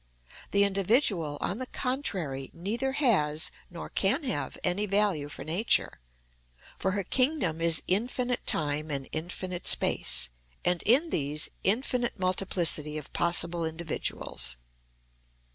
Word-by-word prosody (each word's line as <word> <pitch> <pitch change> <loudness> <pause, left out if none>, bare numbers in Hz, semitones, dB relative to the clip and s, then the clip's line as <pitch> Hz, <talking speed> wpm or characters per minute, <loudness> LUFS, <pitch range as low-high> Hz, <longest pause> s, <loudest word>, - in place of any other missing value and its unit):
The 200 0 +3
individual, 195 - +1
on 200 - -2
the 255 - -4
contrary, 185 - -3
neither 230 +10 -2
has 170 - +2 0.2
nor 175 - -8
can 210 - +1
have 255 - -3
any 195 +4 +1
value 200 -7 +1
for - - -8
Nature, 180 +8 +1 0.8
for 190 - 0
her 200 -1 -1
kingdom 250 - +1
is 165 -1 +3
infinite 245 +5 -1
time 150 +1 +1
and 140 -2 -3
infinite 180 +2 -5
space, 60 -1 +3 0.3
and 180 -1 +3
in 285 +8 +4
these 150 +1 -2
infinite 240 +3 0
multiplicity 175 -5 +2
of 150 - -9
possible 170 0 +1
individuals. 160 - -1
185 Hz, 120 wpm, -28 LUFS, 155-230 Hz, 0.8 s, in